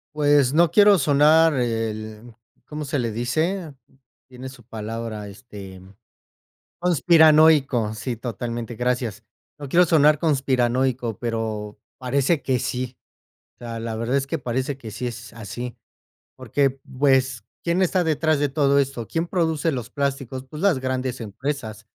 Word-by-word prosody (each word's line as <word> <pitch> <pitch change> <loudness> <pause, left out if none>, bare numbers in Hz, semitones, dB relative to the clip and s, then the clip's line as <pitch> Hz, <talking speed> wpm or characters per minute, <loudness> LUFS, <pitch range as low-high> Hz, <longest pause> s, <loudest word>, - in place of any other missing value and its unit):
Pues 145 -3 +3
no 165 0 +4
quiero 205 -1 +6
sonar 150 +2 +4
el, 115 -2 -3 0.4
¿cómo 150 0 -5
se 140 0 -2
le 115 -2 -1
dice?, 155 - -2 0.6
tiene 130 0 -9
su 130 -2 -12
palabra 110 -1 -6
este 100 -3 -11 1.0
conspiranoico. 155 -8 +4
Sí, 115 +2 -4
totalmente, 120 0 -5
gracias. 120 -3 -2 0.3
No 145 -2 -8
quiero 175 +5 +5
sonar 150 -3 +4
conspiranoico, 130 - 0
pero 110 -3 -4 0.2
parece 140 +4 0
que 130 -2 0
sí. 125 +1 -4 0.6
La 115 -1 -6
la 115 -1 -4
verdad 115 +3 -2
es 135 0 -1
que 165 - -2
parece 130 +2 -3
que 110 -5 -9
sí 125 +4 -3
es 120 -1 -9
así, 115 +3 -7 0.6
porque, 140 -1 0 0.3
pues, 130 -4 +2 0.2
¿quién 170 +2 +1
está 185 0 +2
detrás 155 -1 +1
de 145 0 +1
todo 140 0 +2
esto? 135 -4 -1
¿Quién 165 +1 -2
produce 165 -3 0
los 125 -3 -5
plásticos? 135 -2 -3
Pues 150 +3 -8
las 195 -8 +3
grandes 130 -1 -3
empresas, 110 -1 -5
130 Hz, 140 wpm, -23 LUFS, 115-150 Hz, 1.0 s, quiero